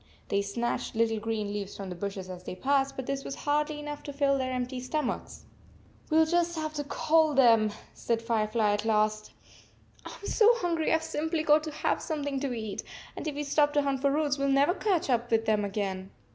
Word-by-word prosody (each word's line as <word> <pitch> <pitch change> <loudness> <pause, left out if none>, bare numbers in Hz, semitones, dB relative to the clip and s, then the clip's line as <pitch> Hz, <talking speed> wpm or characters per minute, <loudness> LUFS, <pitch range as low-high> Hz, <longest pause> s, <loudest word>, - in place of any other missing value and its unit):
They 200 - +2
snatched 235 +5 -3
little 225 -1 +1
green 215 -2 -2
leaves 205 -1 -5
from 195 -2 -6
the 180 - -5
bushes 195 0 -5
as 180 -1 -8
they 180 - -6
passed, 275 +6 +1
but 265 - -5
this 275 +1 -3
was - - -5
hardly 300 +1 0
enough 295 0 -6
to 285 - -7
fill 280 0 +2
their 260 0 -1
empty 255 0 -3
stomachs. 255 +1 -3 0.6
44 310 - +1
We 320 - +7
ll - - -1
just 345 +1 +1
have 310 -1 -3
to 295 -1 -3
call 310 +1 +2
them," 225 -5 +5 0.2
said 230 -1 -1
Fire 225 -2 0
fly 215 -1 +2
at 205 - -1
last. 215 -1 +1 0.8
4< - - -7
I - - -9
m - - -4
so 435 -1 +5
hungry 340 -7 0
I 320 - +5
Ve 320 - -8
simply 320 0 -2
got 305 0 +4
to 310 - -4
have 300 - -1
something 285 -4 -2
to 275 -1 -2
eat, 220 -4 -4 0.3
and - - -5
if 300 - -3
we 295 - -2
stop 290 0 +2
to 290 -1 +3
hunt 275 -2 -1
for 280 - +3
roots, 290 -1 0
we 275 - +1
11 275 0 +3
never 285 +5 +4
catch 385 -4 0
up 240 -2 0
with 225 -1 +2
them 215 -1 +2
again." 195 -2 -3
270 Hz, 235 wpm, -29 LUFS, 215-300 Hz, 0.8 s, We